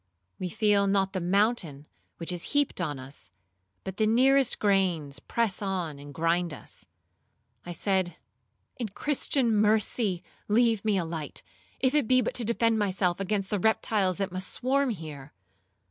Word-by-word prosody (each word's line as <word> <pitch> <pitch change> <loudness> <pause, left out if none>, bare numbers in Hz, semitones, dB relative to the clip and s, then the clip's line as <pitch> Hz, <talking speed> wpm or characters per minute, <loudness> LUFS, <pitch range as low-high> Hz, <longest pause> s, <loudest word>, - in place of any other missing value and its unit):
We 180 - -3
feel 205 -1 +2
not 195 -1 +1
the 190 - -1
mountain 180 - +1 0.3
which 165 +1 -4
is 175 +7 -4
heaped 285 -9 +1
on 150 -5 -2
us, 130 -7 -8 0.5
but 190 0 -6
the 215 - +2
nearest 260 +3 +4
grains 180 -9 +1
press 225 +1 -1
on 180 -7 -3
and 145 0 -10
grind 165 +1 0
us. - - -10 0.8
I 175 - -4
said, 185 0 0 0.6
'In 235 - -2
Christian 265 +1 +1
mercy 210 -2 +2 0.2
leave 225 -1 +3
me 215 -2 +2
a 175 - 0
light, 160 -2 -5 0.4
if 260 0 +2
it 295 -6 +2
be 255 +1 +5
but 245 - -1
to 245 - +2
defend 230 0 +1
myself 185 -3 0
against 195 0 -2
the 205 - +1
reptiles 205 -2 +1
that 195 -1 -2
must 185 0 -4
swarm 270 +2 +1
here.' 155 - -7
195 Hz, 160 wpm, -28 LUFS, 175-225 Hz, 0.8 s, be